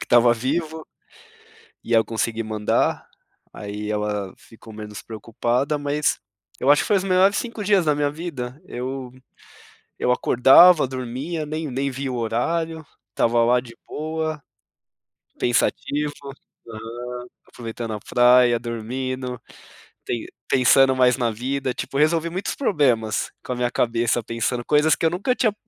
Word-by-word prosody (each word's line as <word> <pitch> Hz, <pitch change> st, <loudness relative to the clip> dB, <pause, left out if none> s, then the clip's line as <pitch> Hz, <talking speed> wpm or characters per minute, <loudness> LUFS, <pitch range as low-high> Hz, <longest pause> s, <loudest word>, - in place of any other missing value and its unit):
que -, -, -6 dB
tava 120 Hz, -1 st, +5 dB
vivo 155 Hz, +6 st, -3 dB, 1.0 s
e -, -, -8 dB
eu 115 Hz, -1 st, +5 dB
consegui 115 Hz, 0 st, -2 dB
mandar, 110 Hz, -1 st, 0 dB, 0.5 s
aí 105 Hz, +1 st, -5 dB
ela 105 Hz, -2 st, -2 dB
ficou 115 Hz, 0 st, -15 dB
menos 105 Hz, 0 st, -8 dB
preocupada. 120 Hz, +6 st, -2 dB
Mas, 145 Hz, +1 st, 0 dB, 0.4 s
eu 135 Hz, -, +1 dB
acho 145 Hz, 0 st, +6 dB
que -, -, -5 dB
foi 205 Hz, -, +3 dB
os 190 Hz, -, -2 dB
melhores 195 Hz, +1 st, +3 dB
5 230 Hz, -3 st, -4 dB
dias 200 Hz, -3 st, +3 dB
da 150 Hz, -1 st, +2 dB
minha 145 Hz, 0 st, 0 dB
vida, 145 Hz, -4 st, -6 dB
eu 130 Hz, -2 st, -5 dB, 0.9 s
eu -, -, 0 dB
acordava, 135 Hz, +7 st, +6 dB
dormia, 130 Hz, +6 st, -4 dB
nem 155 Hz, 0 st, -4 dB
nem 135 Hz, +2 st, -1 dB
via 135 Hz, +1 st, -4 dB
o -, -, -3 dB
horário, 160 Hz, +8 st, -2 dB, 0.3 s
tava 115 Hz, 0 st, +3 dB
lá 125 Hz, +1 st, +3 dB
de 115 Hz, -2 st, -14 dB
boa, 155 Hz, -1 st, -4 dB, 1.0 s
pensativo, 145 Hz, +5 st, 0 dB, 0.5 s
aham, 115 Hz, +1 st, -8 dB, 0.5 s
aproveitando 115 Hz, -1 st, -6 dB
a -, -, -4 dB
praia, 125 Hz, +1 st, +4 dB
dormindo, 125 Hz, +2 st, -4 dB, 0.7 s
pen 120 Hz, -, -3 dB, 0.2 s
pensando 130 Hz, +1 st, +5 dB
mais 125 Hz, -1 st, +4 dB
na 120 Hz, -3 st, +1 dB
vida. 130 Hz, +3 st, -2 dB
Tipo, 135 Hz, -, -4 dB
resolvi 160 Hz, +3 st, +2 dB
muitos 185 Hz, +4 st, -3 dB
problemas 130 Hz, -, +1 dB
com 125 Hz, -, -3 dB
a -, -, -5 dB
minha 120 Hz, 0 st, 0 dB
cabeça 115 Hz, 0 st, 0 dB
pensando 115 Hz, +2 st, -2 dB
coisas 150 Hz, +1 st, +4 dB
que -, -, -2 dB
eu -, -, +5 dB
nunca 200 Hz, +9 st, 0 dB
tinha 220 Hz, -5 st, +1 dB
130 Hz, 145 wpm, -22 LUFS, 115-150 Hz, 1.0 s, acho